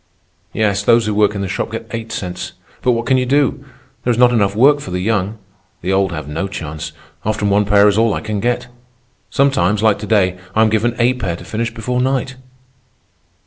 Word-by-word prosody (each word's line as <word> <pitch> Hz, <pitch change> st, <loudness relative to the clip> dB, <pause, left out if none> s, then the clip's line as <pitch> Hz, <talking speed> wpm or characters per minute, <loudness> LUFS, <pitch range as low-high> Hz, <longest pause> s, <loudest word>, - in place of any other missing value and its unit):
"Yes, 105 Hz, -2 st, +1 dB
those 115 Hz, +1 st, +4 dB
who 105 Hz, -, -1 dB
work 105 Hz, 0 st, +2 dB
in 100 Hz, -, -3 dB
the 100 Hz, -, -2 dB
shop -, -, -3 dB
get -, -, -4 dB
eight 115 Hz, 0 st, -5 dB
cents. 90 Hz, -3 st, -5 dB, 0.3 s
But 125 Hz, -, +3 dB
what 115 Hz, 0 st, -2 dB
can 130 Hz, -, +3 dB
you 125 Hz, -, +1 dB
do? 140 Hz, 0 st, +1 dB, 0.4 s
There -, -, -1 dB
is 120 Hz, -, +2 dB
not 125 Hz, 0 st, +5 dB
enough 100 Hz, -3 st, +2 dB
work 140 Hz, +6 st, +5 dB
for 145 Hz, -, -8 dB
the 90 Hz, 0 st, -2 dB
young. 100 Hz, +1 st, -1 dB, 0.5 s
The 95 Hz, -, 0 dB
old 95 Hz, 0 st, +2 dB
have 75 Hz, -3 st, -5 dB
no 80 Hz, +6 st, -3 dB
chance. 80 Hz, -5 st, -6 dB, 0.3 s
Often 110 Hz, -1 st, 0 dB
one 105 Hz, +1 st, +3 dB
pair 100 Hz, 0 st, +5 dB
is 105 Hz, +1 st, +3 dB
all 115 Hz, -2 st, +2 dB
I -, -, -3 dB
can 110 Hz, -2 st, -3 dB
get. 120 Hz, +3 st, 0 dB, 0.6 s
Sometimes, 110 Hz, -7 st, +2 dB
like 110 Hz, -2 st, +3 dB
to 105 Hz, -, -6 dB
day, 95 Hz, -4 st, +2 dB, 0.2 s
I 110 Hz, -, +5 dB
am 110 Hz, -, +3 dB
given 115 Hz, +2 st, +1 dB
eight 125 Hz, +1 st, +2 dB
pair 85 Hz, -6 st, -2 dB
to -, -, -11 dB
finish 115 Hz, +1 st, -2 dB
before 125 Hz, +2 st, -2 dB
night." 135 Hz, 0 st, 0 dB
110 Hz, 220 wpm, -17 LUFS, 100-120 Hz, 0.6 s, not